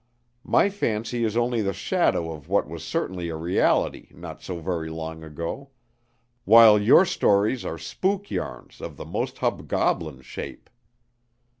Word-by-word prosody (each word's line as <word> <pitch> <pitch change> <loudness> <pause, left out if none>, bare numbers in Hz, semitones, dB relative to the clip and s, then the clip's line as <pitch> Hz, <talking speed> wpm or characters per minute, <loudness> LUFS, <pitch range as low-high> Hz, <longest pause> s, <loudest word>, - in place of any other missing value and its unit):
My 200 - +3
fancy 115 - -2
is 110 0 0
only 120 -1 +1
the 100 -1 -1
shadow 80 -1 0
of 75 0 -10
what 100 -4 +2
was 80 +1 -8
certainly 90 +1 -3
a 80 - -4
reality 85 +3 +1
not - - -9
so 90 -2 -6
very 80 -2 -3
long 80 0 -6
ago; 85 - -6 0.7
while 110 -1 +8
your 120 - +6
stories 105 - +2
are 80 - -4
spook 190 - -2
yarns - - -6
of - - -7
the - - -7
most - - -3
hobgoblin 75 -6 -1
shape. 60 - -8
95 Hz, 145 wpm, -25 LUFS, 80-115 Hz, 0.7 s, while